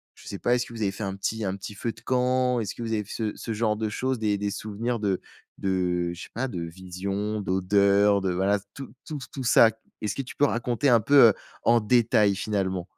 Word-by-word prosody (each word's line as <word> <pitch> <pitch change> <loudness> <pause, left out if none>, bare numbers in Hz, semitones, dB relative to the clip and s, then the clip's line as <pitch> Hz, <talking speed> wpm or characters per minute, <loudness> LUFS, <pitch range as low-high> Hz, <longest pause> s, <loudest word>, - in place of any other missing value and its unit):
je - - -17
sais 100 - -6
pas 120 - +2
est - - +1
ce 125 - -1
que 120 - -11
vous 110 - -7
avez 100 -2 +1
fait 110 - -6
un 95 0 -3
petit 110 +2 -2
un 95 0 -2
petit 100 +2 -8
feu 115 +3 -3
de 110 - -16
camp? 125 0 +1
Est - - -3
ce 95 - -4
que - - -9
vous 115 -1 -2
avez 105 -1 0
f 100 - -18
ce 110 -2 -3
ce 115 - -5
genre 105 0 +1
de 110 0 -2
choses, 130 +2 -2
des-des 105 -2 0
souvenirs 110 +3 -3
de 100 -3 0 0.4
de 90 -2 0
je 85 - -9
sais - - -11
pas. 130 +4 -2
De 90 -6 -5
vision, 95 +5 -4
d'odeur, 100 +2 +3
de 95 -1 0
voilà 95 +3 +2
s 100 - -3
tout 135 -4 -9
tout 150 -2 -5
tout 135 - -5
ça. 115 -1 +6 0.3
Est-ce 105 +1 -2
que 135 - -2
tu 130 - -10
peux 145 - +4
raconter 120 +1 0
un 120 -2 +6
peu, 145 +6 +2
heu, - - +2 0.3
en 120 0 +5
détail 105 -3 +3
finalement? 95 -3 -1
105 Hz, 255 wpm, -26 LUFS, 95-120 Hz, 0.4 s, ça